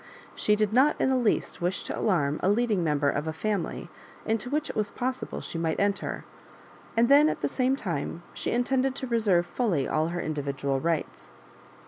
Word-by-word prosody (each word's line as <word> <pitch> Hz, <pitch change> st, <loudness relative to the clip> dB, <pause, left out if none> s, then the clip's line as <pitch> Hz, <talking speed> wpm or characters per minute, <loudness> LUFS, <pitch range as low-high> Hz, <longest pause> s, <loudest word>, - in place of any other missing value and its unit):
She 210 Hz, -, +2 dB
did 215 Hz, 0 st, 0 dB
not 265 Hz, +5 st, +4 dB
in -, -, +2 dB
the 265 Hz, -, +3 dB
least 240 Hz, -7 st, 0 dB
wish 180 Hz, +2 st, -1 dB
to -, -, -4 dB
alarm 150 Hz, -8 st, +1 dB
a 185 Hz, -, +2 dB
leading 210 Hz, -3 st, +2 dB
member 150 Hz, -3 st, +1 dB
of 145 Hz, +2 st, 0 dB
a -, -, 0 dB
family 200 Hz, +2 st, -3 dB, 0.4 s
into 225 Hz, +2 st, -1 dB
which 300 Hz, +3 st, -1 dB
it -, -, -6 dB
was 210 Hz, -1 st, 0 dB
possible 255 Hz, +3 st, -4 dB
she 165 Hz, -, -5 dB
might 165 Hz, -1 st, -1 dB
.enter; 200 Hz, 0 st, -1 dB, 0.7 s
and 235 Hz, +1 st, +5 dB
then 290 Hz, +3 st, +6 dB
at -, -, -3 dB
the -, -, +1 dB
same 260 Hz, 0 st, +1 dB
time 170 Hz, -, -4 dB
she -, -, -3 dB
intended 260 Hz, +2 st, +1 dB
to 265 Hz, -, -4 dB
reserve 215 Hz, -8 st, +2 dB
fully 175 Hz, -, 0 dB
lUl 155 Hz, +1 st, +1 dB
her 175 Hz, +1 st, -3 dB
individual 140 Hz, -3 st, -2 dB
rights. 165 Hz, +1 st, -3 dB
205 Hz, 190 wpm, -27 LUFS, 160-245 Hz, 0.7 s, then